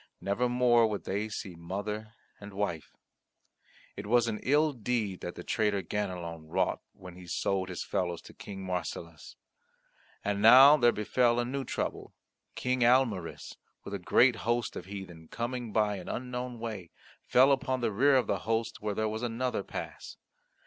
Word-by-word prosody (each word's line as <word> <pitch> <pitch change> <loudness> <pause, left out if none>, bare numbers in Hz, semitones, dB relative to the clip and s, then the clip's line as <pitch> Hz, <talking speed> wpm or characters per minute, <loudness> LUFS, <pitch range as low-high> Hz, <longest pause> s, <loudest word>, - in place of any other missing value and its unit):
Never 110 +6 0
more 120 -2 +4
would 105 -2 -4
they 105 +3 -2
see 100 -3 -6
mother 105 +6 -5 0.2
and 105 -1 -10
wife. 90 -7 -3 1.0
It 100 +1 -7
was 120 +1 +3
an 105 -2 -2
ill 150 +3 +3
deed 115 -5 -2
that 90 - -5
the 90 - -8
traitor 105 -1 0
Ganelon 85 -4 -4
wrought 95 +3 0
when 90 -1 -12
he 90 -1 -12
sold 95 +2 -1
his 90 - -4
fellows 85 -2 -1
to - - -13
King 95 -2 -8
Marsilas! 85 -3 -5 0.9
And 100 0 0
now 130 +6 +9
there 120 -5 +4
befell 120 +3 +2
a 120 - 0
new 135 +2 -3
trouble. - - -4 0.4
King 125 0 -1
Almaris, 120 -8 +1 0.3
with 100 - -8
a 100 - -3
great 120 +6 +4
host 120 0 -1
of - - -6
heathen, 90 -5 -9
coming 120 +1 -4
by 105 -1 +1
an 90 - -8
unknown 125 0 -4
way, 110 -7 -6 0.4
fell 130 +3 +6
upon 130 -1 0
the 115 - 0
rear 135 +6 +4
of 130 - +3
the - - -1
host 115 +1 -1
where 105 -1 -2
there 110 +1 0
was 110 +1 -3
another 125 +1 -1
pass. - - -7
110 Hz, 170 wpm, -30 LUFS, 95-120 Hz, 1.0 s, now